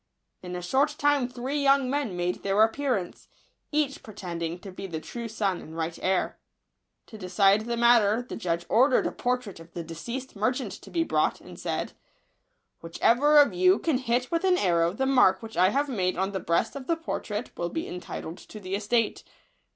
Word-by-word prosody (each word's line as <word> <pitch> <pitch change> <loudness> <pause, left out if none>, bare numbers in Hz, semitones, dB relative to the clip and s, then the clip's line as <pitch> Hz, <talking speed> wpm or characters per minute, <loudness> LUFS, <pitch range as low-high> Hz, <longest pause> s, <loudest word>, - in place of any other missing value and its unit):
In 180 0 -6
a 180 - -5
short 275 - +1
time 290 -3 +2
three 255 +4 -3
young 275 -1 +4
men 260 -9 -2
made 175 0 -1
their 200 +2 +3
ap 220 0 +2
pearance, 255 -11 -2 0.4
each 295 -2 0
pretending 175 -5 -5
to 195 - -9
be 195 +1 -7
the 165 -3 -4
true 235 +8 -6
son 205 -5 -1
and 160 +1 -10
right 165 0 -3
heir. 185 0 0 0.7
To 220 - -12
decide 195 +3 +3
the 235 0 -2
matter, 235 -1 +4
the - - -6
judge 170 -4 -2
ordered 255 +3 +4
a - - 0
portrait 245 -7 -2
of 165 0 -14
the 170 - -5
deceased 235 +12 -6
mer 215 +5 +1
chant 250 -6 -5
to - - -11
be 335 -1 +1
brought, - - +1
and - - -12
said, - - -3 0.4
" - - -49
Whichever 245 - +3
of 290 -8 +6
you 185 +2 +4
can 295 -3 0
hit 250 0 -1
with 335 +1 0
an 370 -1 +4
arrow 170 - +2
the 265 +8 -1
mark 250 -7 +4
which 225 0 -8
I 185 +2 +5
have 280 +6 0
made 185 -9 -1
on 190 +2 0
the 195 - -3
breast 175 +6 0
of 270 -2 -7
the 335 - +1
portrait 230 -8 -4
will 175 - -2
be 325 - -4
entitled 180 -1 -7
to 215 - -11
the 185 -1 -6
estate." 215 +3 0
220 Hz, 205 wpm, -27 LUFS, 180-260 Hz, 0.7 s, of